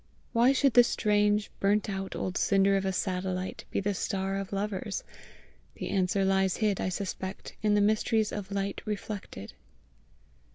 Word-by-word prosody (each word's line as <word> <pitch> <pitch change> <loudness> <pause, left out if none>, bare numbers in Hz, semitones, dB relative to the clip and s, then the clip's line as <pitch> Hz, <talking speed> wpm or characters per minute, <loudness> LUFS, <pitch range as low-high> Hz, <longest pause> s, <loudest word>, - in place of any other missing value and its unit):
Why 240 +2 +5
should 275 -1 +3
the 245 - +8
strange, 210 -2 +1
burnt 205 +1 +2
out 195 -1 -4
old 185 - -3
cinder 195 0 +3
of 195 0 0
a 190 - +1
satellite 185 0 -3
be - - -1
the 200 +1 0
star 195 0 -2
of 195 -1 -5
lovers? 200 0 -3 0.7
The - - -5
answer 195 0 +1
lies 190 -1 +2
hid, 210 -4 +1
I - - 0
suspect, 190 0 -5
in 210 -1 +3
the 205 - +4
mysteries 215 +1 +2
of 200 -2 -5
light 200 0 -2
reflected. 205 - -5
200 Hz, 160 wpm, -29 LUFS, 190-210 Hz, 0.7 s, the